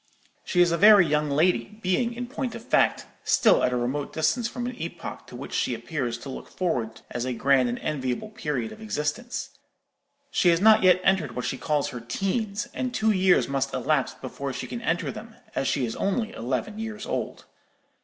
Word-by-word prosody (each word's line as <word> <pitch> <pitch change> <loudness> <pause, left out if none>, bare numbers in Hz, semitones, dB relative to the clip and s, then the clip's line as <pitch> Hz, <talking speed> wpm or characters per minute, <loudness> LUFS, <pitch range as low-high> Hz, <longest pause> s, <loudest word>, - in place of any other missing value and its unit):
"She 180 - +2
is 175 -1 +4
a 170 - 0
very 205 -2 +8
young 150 -1 +1
lady, 175 +7 +1
being, 230 +6 +1
in 245 +1 -4
point 250 -2 -4
of 235 0 -9
fact, - - +2 0.2
still - - +4
at 125 - +3
a 125 - 0
remote 130 +4 -2
distance 225 +9 +1
from 240 0 -5
an 250 0 -4
epoch 165 - -6
to - - -11
which - - -8
she 125 - 0
appears 120 0 -3
to 135 - -9
look 130 - -7
forward 120 -11 -2
as 120 - -2
a 130 0 -2
grand 130 0 +3
and 120 - -2
enviable 130 - -3
period 145 - -3
of 220 - -11
existence. 240 - -3 0.8
She 180 - +3
has 165 -1 +4
not 220 +2 +6
yet 185 -1 +5
entered 175 -10 +2
what 125 - -3
she - - -1
calls 150 -2 0
her 125 - -6
'teens,' 200 - -2
and 255 -1 -2
two 220 -2 +3
years 185 -2 +4
must 135 0 -1
elapse 150 -4 0
before 135 +1 -5
she 140 - -4
can 235 - -6
enter 170 -5 0
them, 220 +1 -10 0.2
as 135 - -1
she 135 -4 +1
is 115 - -4
only 220 +3 -1
eleven 130 - -3
years 220 -1 -5
old. - - -4
170 Hz, 205 wpm, -26 LUFS, 135-215 Hz, 0.8 s, very